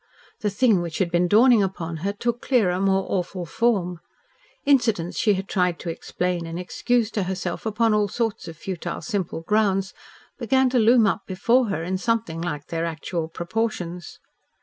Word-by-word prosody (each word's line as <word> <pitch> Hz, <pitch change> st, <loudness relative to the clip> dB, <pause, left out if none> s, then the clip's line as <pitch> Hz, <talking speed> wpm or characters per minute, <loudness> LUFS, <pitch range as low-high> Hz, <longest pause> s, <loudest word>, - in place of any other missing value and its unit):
The 210 Hz, -, 0 dB
thing 205 Hz, -2 st, +3 dB
which 170 Hz, -2 st, -4 dB
had 180 Hz, -3 st, 0 dB
been 175 Hz, +1 st, +2 dB
dawning 225 Hz, +3 st, +6 dB
upon 170 Hz, -4 st, -3 dB
her 190 Hz, +6 st, -2 dB
took 235 Hz, +3 st, -2 dB
clearer, 200 Hz, -9 st, +2 dB
more 195 Hz, 0 st, +2 dB
awful 180 Hz, -1 st, -2 dB
form. 180 Hz, -3 st, 0 dB, 0.7 s
Incidents 225 Hz, -11 st, +2 dB
she 210 Hz, -2 st, +3 dB
had 190 Hz, +1 st, -4 dB
tried 180 Hz, -3 st, +1 dB
to 170 Hz, -, -4 dB
explain 175 Hz, +1 st, -3 dB
and 165 Hz, +1 st, -5 dB
excuse 230 Hz, +5 st, 0 dB
to 210 Hz, -, -1 dB
herself, 185 Hz, +2 st, -3 dB
upon 220 Hz, +1 st, +2 dB
all 210 Hz, -1 st, +2 dB
sorts 225 Hz, -3 st, -2 dB
of 165 Hz, -1 st, -8 dB
futile, 175 Hz, -1 st, -5 dB
simple 195 Hz, -8 st, -3 dB
grounds, 195 Hz, -1 st, +1 dB, 0.5 s
began 260 Hz, +2 st, +2 dB
to 250 Hz, -, +3 dB
loom 230 Hz, +1 st, +5 dB
up 200 Hz, 0 st, +1 dB
before 230 Hz, +6 st, +2 dB
her 195 Hz, -5 st, -2 dB
in 185 Hz, +2 st, -2 dB
something 225 Hz, -8 st, -1 dB
like 150 Hz, -4 st, -4 dB
their 165 Hz, 0 st, -2 dB
actual 165 Hz, 0 st, -3 dB
proportions. 175 Hz, -1 st, -4 dB
195 Hz, 170 wpm, -24 LUFS, 175-225 Hz, 0.7 s, dawning